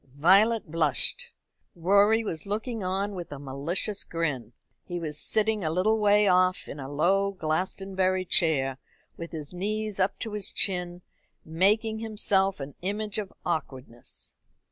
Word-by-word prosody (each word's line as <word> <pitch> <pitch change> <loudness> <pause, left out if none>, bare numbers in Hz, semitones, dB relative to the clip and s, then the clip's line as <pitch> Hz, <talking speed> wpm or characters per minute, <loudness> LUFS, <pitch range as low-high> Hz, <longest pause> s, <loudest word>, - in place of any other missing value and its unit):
Violet 200 +5 +3
blushed. 155 -5 +4 0.5
Rorie 200 +6 +3
was 165 -5 -6
looking 220 +1 -3
on 195 +3 -2
with 175 -5 -7
a 145 - -6
malicious 145 +9 -1
grin. 150 -8 -4 0.3
He 175 -1 -5
was 155 -3 -4
sitting 220 -2 +1
a 155 - 0
little 200 +7 +1
way 210 0 +4
off 185 0 +2
in 145 - -8
a 135 0 -7
low 195 +7 +1
Glastonbury 185 +2 -1
chair, 135 -7 +1 0.4
with 170 0 -8
his 155 -1 -8
knees 210 +2 -3
up 190 +1 0
to 225 - -6
his 210 -2 -2
chin, 180 -2 -2 0.4
making 210 +7 +1
himself 200 -4 +1
an 140 0 -7
image 210 +2 -3
of 200 -3 -6
awkwardness. 130 -8 -6
185 Hz, 145 wpm, -26 LUFS, 160-205 Hz, 0.5 s, blushed